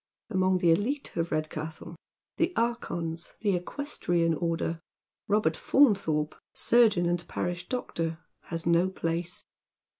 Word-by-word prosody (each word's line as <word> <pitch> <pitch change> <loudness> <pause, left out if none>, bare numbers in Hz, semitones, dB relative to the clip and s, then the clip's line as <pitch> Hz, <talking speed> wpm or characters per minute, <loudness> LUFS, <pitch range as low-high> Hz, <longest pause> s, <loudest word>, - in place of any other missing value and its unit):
Among 185 -1 +3
the 175 -2 +4
elite 245 - 0
of 170 0 -1
Redcastle 155 +1 -4 0.2
— - - -64
the 335 +2 +1
archons 170 -8 -2
— - - -39
the 205 -4 +2
equestrian 175 - -1
order 165 0 -1 0.2
— - - -64
Robert 205 -6 +2
Faunthorpe, 195 - +3 0.2
surgeon 220 -7 +4
and 175 0 -1
parish 175 0 -3
doctor, 165 -10 -2 0.3
has 165 -1 -4
no 170 +2 +4
place. 170 -1 -3
175 Hz, 130 wpm, -29 LUFS, 165-205 Hz, 0.3 s, the